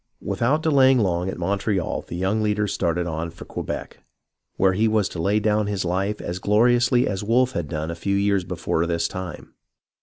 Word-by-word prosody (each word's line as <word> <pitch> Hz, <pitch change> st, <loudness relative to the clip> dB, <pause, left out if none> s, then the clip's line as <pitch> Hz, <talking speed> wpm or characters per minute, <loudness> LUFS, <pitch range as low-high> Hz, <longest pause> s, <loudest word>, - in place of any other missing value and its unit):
Without 145 Hz, +7 st, 0 dB
delaying 135 Hz, -4 st, +5 dB
long 90 Hz, -4 st, 0 dB
at -, -, -5 dB
Montreal 95 Hz, +1 st, -1 dB
the -, -, -6 dB
young 95 Hz, +5 st, 0 dB
leader 105 Hz, -1 st, +1 dB
started 90 Hz, -3 st, -1 dB
on 80 Hz, 0 st, -3 dB
for 85 Hz, -, -11 dB
Quebec, -, -, -6 dB, 0.6 s
where 95 Hz, 0 st, +3 dB
he 110 Hz, +4 st, +2 dB
was 110 Hz, -2 st, +2 dB
to 85 Hz, -, -5 dB
lay 100 Hz, +5 st, +2 dB
down 105 Hz, 0 st, +1 dB
his 100 Hz, -2 st, -2 dB
Ufe 95 Hz, +4 st, -1 dB
as 90 Hz, +1 st, -4 dB
gloriously 120 Hz, +4 st, +3 dB
as 95 Hz, 0 st, -3 dB
Wolfe 125 Hz, +4 st, +2 dB
had 85 Hz, -, -3 dB
done 75 Hz, +2 st, -3 dB
a -, -, -5 dB
few 100 Hz, +3 st, -1 dB
years 100 Hz, -1 st, +2 dB
before 85 Hz, -2 st, -1 dB
this 85 Hz, 0 st, 0 dB
time. 95 Hz, -4 st, -7 dB
100 Hz, 190 wpm, -23 LUFS, 85-110 Hz, 0.6 s, delaying